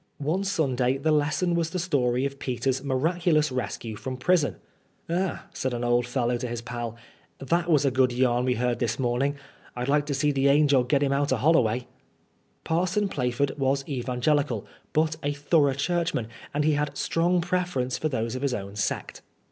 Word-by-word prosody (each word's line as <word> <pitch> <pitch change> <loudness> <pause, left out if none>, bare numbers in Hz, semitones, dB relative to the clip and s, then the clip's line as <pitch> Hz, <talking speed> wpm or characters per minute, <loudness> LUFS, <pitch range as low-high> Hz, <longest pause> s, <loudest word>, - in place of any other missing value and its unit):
One 160 +7 -1
Sunday 135 -9 +1
the 155 +3 0
lesson 155 +3 +1
was 170 -1 0
the 185 - -4
story 135 -8 +1
of 140 0 -4
Peter's 130 +1 -1
miraculous 155 +2 +1
rescue 120 -3 -4
from 130 +3 -5
prison. 160 +1 +2 0.5
*^Ah," 180 +1 -1
said 130 -2 -2
an 120 - -3
old 120 0 +2
fellow 125 -1 0
to 125 +1 -4
his 120 -1 -4
pal, 120 -1 -5 0.2
'' - - -35
that 170 0 +2
was 150 -3 +4
a 135 - +3
good 130 0 +3
yarn 125 0 +2
we 125 -1 +1
heard 120 +1 0
this 120 -1 -1
morning. 130 +3 0 0.4
I'd 125 +1 -3
like 145 +1 +2
to 145 - -1
see 145 +2 +1
th' 135 - -2
angel 140 -2 +4
git 140 +3 +2
'im 140 -1 +1
out 140 0 +1
o' - - +4
Hol 155 +8 +4
loway." 120 -4 +2 0.8
Parson 185 +5 0
Plaf 125 -6 -2
ord 140 -1 +3
was 135 0 +1
evangelical, 130 -2 0 0.3
but 155 0 +1
a 145 0 -1
thorough 145 -1 +2
Churchman, 160 -6 -1 0.2
and 150 +1 0
he 155 - +3
had 150 0 0
a - - -19
strong 175 +2 +1
preference 175 -8 -1
for 155 - 0
those 115 -4 -2
of 130 - -4
his 140 -3 0
own 100 -1 -6
sect. 105 - -3
140 Hz, 195 wpm, -26 LUFS, 125-155 Hz, 0.8 s, was